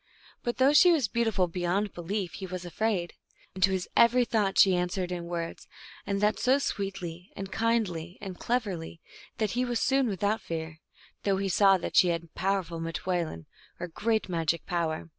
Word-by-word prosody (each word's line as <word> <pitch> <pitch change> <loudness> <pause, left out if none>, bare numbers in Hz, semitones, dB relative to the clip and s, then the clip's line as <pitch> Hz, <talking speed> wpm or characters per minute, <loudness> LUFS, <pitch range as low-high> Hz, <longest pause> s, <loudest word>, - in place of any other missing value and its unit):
But 240 - -2
though 265 +2 +5
she 355 +4 +7
was 295 -9 +2
beautiful 220 -4 +1
beyond 180 +4 -1
belief, 180 +1 -3
he 190 - -6
was 185 0 -6
afraid. 175 0 -1 0.4
And 185 - -8
to 190 - +6
his 190 -1 -1
every 245 +1 +5
thought 210 -4 0
she 190 -2 +6
an 180 0 0
swered 180 -1 -3
in 175 -1 -4
words, 170 -1 -5 0.4
and 200 0 0
that 210 0 +2
so 260 +2 +4
sweetly 190 -8 -4
and 195 0 -6
kindly 190 -7 -1
and 190 -3 -7
cleverly 195 -9 -2 0.4
that 215 -3 0
he 250 +1 0
was 240 -2 -1
soon 270 -1 +2
without 205 +1 0
fear, 160 -2 -5 0.4
though 195 -1 +1
he 195 0 -1
saw 195 +1 +5
that 175 - -5
she 180 - +7
had 170 -1 -2
powerful 190 -3 -1
niteoulin, 165 - -3 0.3
or 180 - -4
great 220 +6 0
magic 165 -2 -1
power. 165 -3 -2
190 Hz, 180 wpm, -28 LUFS, 175-215 Hz, 0.4 s, she